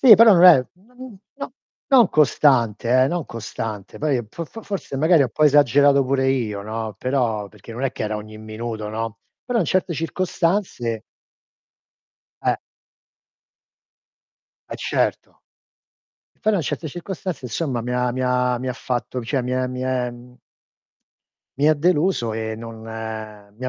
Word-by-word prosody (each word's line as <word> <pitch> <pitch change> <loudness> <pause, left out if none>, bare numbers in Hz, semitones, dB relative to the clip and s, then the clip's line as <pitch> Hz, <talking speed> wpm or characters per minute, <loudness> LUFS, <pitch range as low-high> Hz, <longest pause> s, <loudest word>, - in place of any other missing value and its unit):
Sì 245 -5 +10
però 225 0 +8
non 175 -1 +6
è 150 -8 +8
non 240 +3 -13 0.2
no 280 -2 -6 0.4
non 255 -4 +7
costante, 130 -5 +3
eh, - - +1
non 175 +1 -2
costante 110 -3 -6
poi 150 -2 +1
po 165 +10 -6
fo 225 +8 -10
fo - - -17
forse 195 -9 -5
magari 160 +2 +4
ho - - +2
'n - - -12
po' 155 - +2
esagerato 140 -1 +5
pure 130 0 +1
io, 110 -6 -1
no, 110 0 -5
però 120 -6 -1
perché 105 +2 -13
non 120 +3 -6
è 135 - +1
che - - -5
era 110 0 -2
ogni 110 +1 -9
minuto, 110 0 -5
no, 115 +1 -4 0.3
però 245 -1 0
in 200 - +2
certe 180 +2 0
circostanze 165 - -1 1.4
Eh. - - +2 2.1
Eh, - - -4
certo. - - -2 0.9
E - - -41
però 215 -1 +2
in 170 - 0
certe 155 +2 -3
circostanze 175 0 -6
insomma 125 +1 -2
mi 125 +2 -4
ha 125 0 +1
mi 130 +1 -3
ha 125 -1 +1
mi 130 - -5
ha - - -1
fatto 125 +1 -3
cioè, 130 +4 -1
mi 125 +1 -3
è 130 0 0
mi 125 0 -5
è, 130 -1 -1
mhmm 120 +1 -14 1.2
mi 145 +2 +4
ha 155 - +5
deluso, 150 - +1
e 110 0 -3
non 115 0 -9
mi 110 0 -8
ha - - 0
130 Hz, 165 wpm, -22 LUFS, 115-160 Hz, 2.1 s, Sì